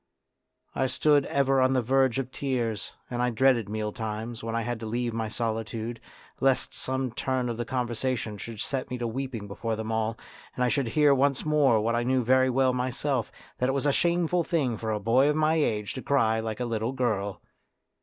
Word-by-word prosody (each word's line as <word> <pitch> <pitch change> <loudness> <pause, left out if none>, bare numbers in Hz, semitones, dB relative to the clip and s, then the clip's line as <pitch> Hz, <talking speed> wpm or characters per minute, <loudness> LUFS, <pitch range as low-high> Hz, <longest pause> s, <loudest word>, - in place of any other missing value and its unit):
I 130 - +1
stood 145 +2 +3
ever 135 -1 +2
on 130 +1 +3
the 130 - +2
verge 130 +1 +2
of 130 -1 -3
tears, 120 -7 -2 0.2
and 120 0 -1
I 125 - +2
dreaded 120 -2 +3
meal 105 0 -2
times, 110 +1 -5
when 115 0 -3
I 115 - 0
had 120 -1 -3
to 110 - -5
leave 120 +1 -1
my 110 -1 -2
solitude, 115 0 -3 0.4
lest 135 -1 +1
some 130 -1 -2
turn 130 +1 -1
of 115 - -3
the 120 - -2
conversation 120 -3 -2
should 115 -2 -7
set 135 -2 -3
me 125 - -3
weeping 120 -2 -4
before 110 +3 -3
them 110 0 -4
all, 110 0 -1 0.4
and 125 - 0
I 125 - +3
should 135 -1 0
hear 150 -2 +6
once 140 +1 +1
more 145 -7 +4
what 115 +2 0
I 120 - +1
knew 130 +1 +1
very 130 +2 +4
well 130 0 +3
myself, 125 0 -1 0.3
that 125 - +2
it - - +1
was 140 +1 -1
a 145 - +3
shameful 175 +1 +2
thing 145 -9 0
for 110 +1 -4
a 105 - -1
boy 125 +7 +3
of 150 - +1
my 155 0 +3
age 110 -10 0
to 130 - -5
cry 115 -6 +2
like 110 0 -4
a 125 - -1
little 115 +1 -2
girl. 110 -6 -1
125 Hz, 210 wpm, -27 LUFS, 110-135 Hz, 0.4 s, hear